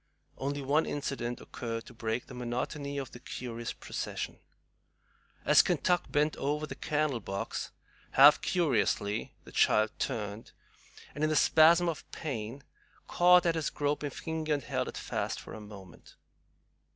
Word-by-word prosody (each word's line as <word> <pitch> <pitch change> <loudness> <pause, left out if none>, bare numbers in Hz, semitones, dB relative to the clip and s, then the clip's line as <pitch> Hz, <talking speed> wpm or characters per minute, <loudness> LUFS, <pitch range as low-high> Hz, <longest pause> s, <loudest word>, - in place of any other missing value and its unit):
Only 140 +1 -2
one 145 +4 +2
incident 135 -4 -3
occurred 115 -1 -5
to - - -12
break 115 +1 -3
the - - -11
monotony 125 +4 -3
of 135 -3 -4
the 120 - -10
curious 120 -2 -5
procession. - - -5 1.1
As - - +7
Kentuck 180 -1 +1
bent 150 +1 +2
over 150 +2 -1
the - - -6
candle 150 -4 -1
box 100 -1 -4 0.4
half 140 +2 +8
curiously, 115 - 0
the - - -13
child 110 0 +3
turned, 105 0 -4 0.6
and, 150 - -4
in 155 - +3
a 155 - +1
spasm 165 +3 +6
of 165 -3 -4
pain, 130 -2 -5 0.4
caught 180 0 +5
at 170 - +3
his 160 -3 -1
groping 145 0 -1
finger, 155 +2 -2
and 140 - -5
held - - -2
it - - -6
fast - - -3
for - - -10
a 110 - -8
moment. 100 -4 -13
140 Hz, 150 wpm, -31 LUFS, 115-155 Hz, 1.1 s, half